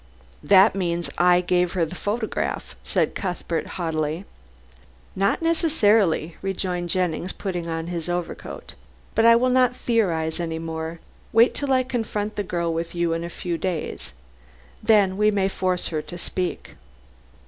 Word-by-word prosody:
"That 195 +1 +6
means, 175 -3 -2
I 180 0 +5
gave 180 0 +1
her 175 -3 +1
the 160 - -8
photograph," 215 +4 -3
said - - 0
Cuthbert 180 -3 -3
haughtily. 160 0 -2 0.9
"Not 200 - +1
necessarily," 220 - +2
rejoined 180 -2 -2
Jennings, 180 0 0
putting 175 -4 -4
on 165 0 -3
his 170 -1 -4
overcoat. 175 -1 -5 0.4
"But 225 +1 +4
I 230 - +8
will 250 +2 +3
not 250 -1 +3
theorize 175 -11 0
any 165 -2 -2
more. 160 0 -5 0.3
Wait 230 +2 +5
till 285 -1 -2
I 260 -1 +4
confront 220 -4 -3
the 205 - -1
girl 170 -3 -1
with 165 +1 -4
you 170 -1 +1
in 165 0 -2
a 170 - -4
few 170 -1 -4
days. 180 -4 -3 0.7
Then 205 -4 +4
we 210 +1 +4
may 200 -2 +2
force 185 -2 -1
her 155 -2 -2
to 175 - -9
speak." 180 +1 -4
180 Hz, 150 wpm, -24 LUFS, 170-210 Hz, 0.9 s, I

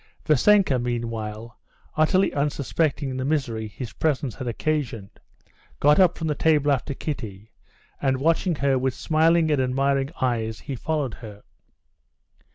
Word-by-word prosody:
Vassenka 155 -1 +4
meanwhile, 115 -2 -4 0.4
utterly 185 +5 +2
unsuspecting 140 -1 -1
the 130 - -2
misery 130 -7 -1
his 110 +2 -8
presence 140 -5 -1
had 130 - -7
occasioned, 120 -5 -3 0.6
got 150 +3 +4
up 185 -2 +4
from 165 - -4
the 155 - +1
table 150 -1 +2
after 140 +1 -1
Kitty, 110 -9 -6 0.5
and 135 -1 +1
watching 165 +5 +1
her 135 -2 +1
with 130 0 -1
smiling 160 0 +2
and 145 -3 +2
admiring 135 +1 +1
eyes, 115 -3 -1
he 135 - -5
followed 145 -2 -2
her. 105 -3 -11
135 Hz, 135 wpm, -24 LUFS, 120-155 Hz, 0.6 s, Vassenka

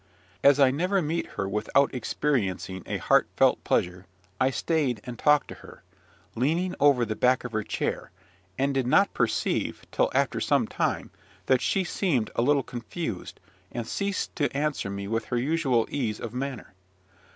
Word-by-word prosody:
As 140 0 +6
I 135 -2 +6
never 180 +8 +1
meet 165 0 -1
her 95 - -1
without 105 +8 +1
experiencing 110 -7 -1
a - - -2
heartfelt - - +2
pleasure, 90 +1 -1 0.3
I 130 - +3
stayed 135 -4 0
and 125 -1 -8
talked 150 -1 +4
to - - -6
her, - - -14 0.5
leaning 165 +9 0
over 140 -4 +4
the 110 -1 -3
back 125 +2 +2
of 125 - -6
her 110 -1 -1
chair, - - -3 0.5
and 140 +1 +1
did 135 -2 0
not 200 +10 +4
perceive, - - -1
till - - +2
after - - +1
some - - +2
time, - - -2 0.3
that - - +3
she 195 - +1
seemed 160 - 0
a - - +2
little 140 +2 +3
confused, 120 - -6 0.3
and 120 -1 -4
ceased 200 - -3
to 145 -4 +1
answer 145 -8 -1
me 100 0 -5
with 115 +1 -1
her 120 - -2
usual 130 -3 +1
ease 115 -7 -2
of 115 -1 -6
manner. 130 -2 -5
130 Hz, 165 wpm, -27 LUFS, 115-150 Hz, 0.5 s, As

